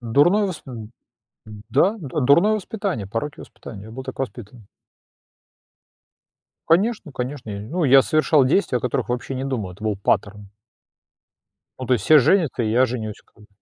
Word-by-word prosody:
Дурное 145 Hz, -, +3 dB
восп 180 Hz, -5 st, -6 dB
д 125 Hz, -4 st, -8 dB, 0.9 s
да, 165 Hz, +9 st, +3 dB
д 150 Hz, -7 st, -8 dB
дурное 170 Hz, +12 st, +4 dB
воспитание, 200 Hz, -, -4 dB
пороки 145 Hz, +8 st, -4 dB
воспитания, 100 Hz, -2 st, -11 dB
я -, -, -11 dB
был 130 Hz, +3 st, -8 dB
так 130 Hz, -, -7 dB
воспитан. 120 Hz, -2 st, -7 dB, 2.0 s
Конечно, 190 Hz, -1 st, +1 dB
конечно, 125 Hz, -2 st, -5 dB
я 100 Hz, -1 st, -5 dB
не 105 Hz, +4 st, -9 dB
ну 175 Hz, +1 st, -1 dB
я 135 Hz, -1 st, +7 dB
совершал 155 Hz, -2 st, +3 dB
действия, 135 Hz, -2 st, +1 dB
о -, -, -7 dB
которых 125 Hz, -1 st, -2 dB
вообще 125 Hz, +2 st, -3 dB
не 130 Hz, -, -3 dB
думал, 110 Hz, -9 st, -3 dB
это 100 Hz, +4 st, -13 dB
был 105 Hz, -2 st, -1 dB
паттерн. 100 Hz, 0 st, -1 dB, 1.3 s
Ну, 130 Hz, -, -4 dB
то 130 Hz, -, +2 dB
есть 110 Hz, -6 st, -1 dB
все 155 Hz, -1 st, +7 dB
женятся, 155 Hz, -4 st, +2 dB
и 110 Hz, -, -1 dB
я 125 Hz, +3 st, +4 dB
женюсь, 110 Hz, -4 st, -5 dB
как -, -, -35 dB
бы. -, -, -19 dB
130 Hz, 170 wpm, -22 LUFS, 110-155 Hz, 2.0 s, я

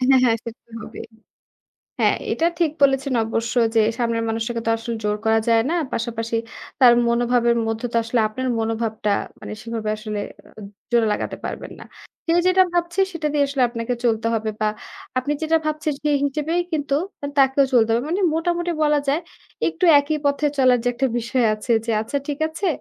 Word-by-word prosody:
হ্যাঁ, 260 Hz, +1 st, +5 dB
হ্যাঁ, 230 Hz, -2 st, +3 dB
সে -, -, -4 dB
তো -, -, -34 dB
হবেই। 220 Hz, +1 st, -9 dB, 0.9 s
হ্যাঁ, -, -, +3 dB, 0.2 s
এটা 330 Hz, -, +1 dB
ঠিক 335 Hz, -3 st, +2 dB
বলেছেন 270 Hz, -1 st, +3 dB
অবশ্য 225 Hz, +1 st, -2 dB, 0.2 s
যে 225 Hz, -, +5 dB, 0.2 s
সামনের 230 Hz, -1 st, 0 dB
মানুষকে 230 Hz, +1 st, -2 dB
তো -, -, +2 dB
আসলে 230 Hz, +1 st, -5 dB
জোর 210 Hz, 0 st, +1 dB
করা 220 Hz, 0 st, +3 dB
যায় 225 Hz, -1 st, +4 dB
না। 345 Hz, -, 0 dB, 0.2 s
পাশাপাশি 230 Hz, 0 st, -2 dB, 0.4 s
তার 250 Hz, -2 st, +8 dB, 0.2 s
মনোভাবের 235 Hz, 0 st, +2 dB
মধ্যে 225 Hz, +2 st, -2 dB
তো -, -, 0 dB
আসলে 230 Hz, +1 st, +1 dB
আপনার 260 Hz, +4 st, -4 dB
মনোভাবটা 225 Hz, -1 st, -1 dB, 0.3 s
মানে -, -, -7 dB
সেভাবে 230 Hz, -2 st, -3 dB
আসলে 215 Hz, -1 st, -4 dB, 0.7 s
জুড়ে 235 Hz, -2 st, +3 dB
লাগাতে -, -, -3 dB
পারবেন -, -, -6 dB
না। -, -, -9 dB, 0.4 s
সে 330 Hz, -, +2 dB
যেটা 370 Hz, 0 st, +5 dB
ভাবছে 345 Hz, +2 st, 0 dB
সেটা 330 Hz, -2 st, -3 dB
দিয়েই 290 Hz, -1 st, +2 dB
আসলে 275 Hz, -2 st, 0 dB
আপনাকে 230 Hz, +1 st, -3 dB
চলতে 225 Hz, -1 st, +1 dB
হবে 220 Hz, 0 st, -1 dB
বা 215 Hz, -, +2 dB, 0.5 s
আপনি 255 Hz, +3 st, -1 dB
যেটা 320 Hz, +1 st, +3 dB
ভাবছেন 305 Hz, 0 st, -1 dB
সে 300 Hz, -, +1 dB
হিসেবেই 305 Hz, +5 st, 0 dB
কিন্তু 290 Hz, -3 st, -1 dB, 0.4 s
তাকেও 270 Hz, +1 st, +5 dB
চলতে 230 Hz, -3 st, +4 dB
হবে। 230 Hz, +1 st, +1 dB
মানে 370 Hz, -, 0 dB
মোটামুটি 345 Hz, +1 st, 0 dB
বলা 300 Hz, -1 st, +3 dB
যায় 290 Hz, +4 st, +2 dB, 0.5 s
একটু 370 Hz, -, -2 dB
একই 300 Hz, +2 st, -1 dB
পথে 285 Hz, +1 st, +1 dB
চলার 255 Hz, -2 st, +5 dB
যে -, -, +2 dB
একটা 265 Hz, +2 st, +1 dB
বিষয় 240 Hz, +1 st, 0 dB
আছে 215 Hz, +3 st, -2 dB
যে -, -, -1 dB
আচ্ছা 225 Hz, +6 st, -2 dB
ঠিক 290 Hz, -1 st, -3 dB
আছে 335 Hz, +5 st, -4 dB
245 Hz, 180 wpm, -22 LUFS, 225-295 Hz, 0.9 s, তার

